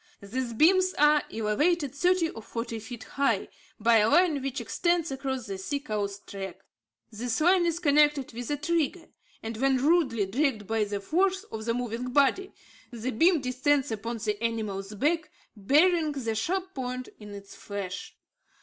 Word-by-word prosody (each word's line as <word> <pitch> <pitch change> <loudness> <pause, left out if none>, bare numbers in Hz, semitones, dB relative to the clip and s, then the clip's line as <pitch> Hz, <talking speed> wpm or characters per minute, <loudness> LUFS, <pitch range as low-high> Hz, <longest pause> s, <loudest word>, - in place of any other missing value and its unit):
These 235 +4 -4
beams 370 +8 +4
are 295 0 +5
elevated 275 +8 0
thirty 355 +2 +2
or 225 - -9
forty 230 +1 -5
feet 230 +2 -8
high, 275 -8 0 0.3
by 230 +1 +5
a 215 0 +4
line 335 -4 +3
which 275 +1 -3
extends 340 +6 0
across 265 -2 -3
the 195 -3 -5
sea 280 +9 -2
cow's 205 -6 -3
track. 195 -3 -8 0.5
This 230 +2 -2
line 350 +2 +4
is 335 -1 0
connected 295 -5 +3
with 240 +1 -6
a 295 - 0
trigger, 330 +3 -1 0.3
and 225 0 -5
when 265 +2 +2
rudely 265 - +2
dragged 225 +1 0
by 220 +1 0
the 205 -1 -4
force 375 - +1
of 220 0 -5
the 230 0 0
moving 245 0 -3
body, 285 +9 +2 0.4
the 240 +1 -4
beam 330 +7 +3
descends 265 +1 +1
upon 230 +2 -4
the 210 0 -3
animal's 210 -3 -3
back, 310 +8 0 0.3
burying 305 - +3
the 235 -5 -2
sharp 370 - -2
point 255 -1 -4
in 210 -1 -9
its 200 0 -11
flesh. 200 -2 -6
255 Hz, 165 wpm, -28 LUFS, 220-305 Hz, 0.5 s, are